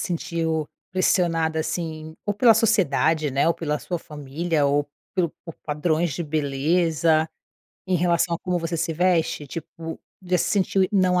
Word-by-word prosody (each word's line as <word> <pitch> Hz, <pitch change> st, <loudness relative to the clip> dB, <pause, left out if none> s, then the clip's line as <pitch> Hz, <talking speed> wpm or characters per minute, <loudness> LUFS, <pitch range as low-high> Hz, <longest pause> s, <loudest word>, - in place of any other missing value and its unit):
sentiu 165 Hz, -3 st, -1 dB, 0.3 s
pressionada, 165 Hz, -3 st, +2 dB
assim, 160 Hz, -1 st, -4 dB
ou 205 Hz, -, 0 dB
pela 230 Hz, +2 st, +6 dB
sociedade, 160 Hz, -, +2 dB
né, 140 Hz, +5 st, +2 dB
ou 170 Hz, -, +2 dB
pela 150 Hz, -2 st, -2 dB
sua 175 Hz, -2 st, -4 dB
família, 150 Hz, +1 st, -2 dB
ou 145 Hz, +1 st, +1 dB, 0.3 s
pelo 175 Hz, -4 st, +1 dB
por 165 Hz, -3 st, -8 dB
padrões 155 Hz, +1 st, 0 dB
de 170 Hz, -, -3 dB
beleza, 155 Hz, +2 st, +1 dB, 0.6 s
em 185 Hz, -, +2 dB
relação 170 Hz, 0 st, +2 dB
a -, -, -4 dB
como 180 Hz, -1 st, -1 dB
você 165 Hz, 0 st, -2 dB
se 165 Hz, -, 0 dB
veste? 170 Hz, -3 st, +1 dB
Tipo, 165 Hz, +2 st, -7 dB, 0.2 s
já 180 Hz, 0 st, +1 dB
se -, -, 0 dB
sentiu 190 Hz, -1 st, +2 dB
não 185 Hz, -3 st, +3 dB
165 Hz, 155 wpm, -24 LUFS, 155-180 Hz, 0.6 s, pela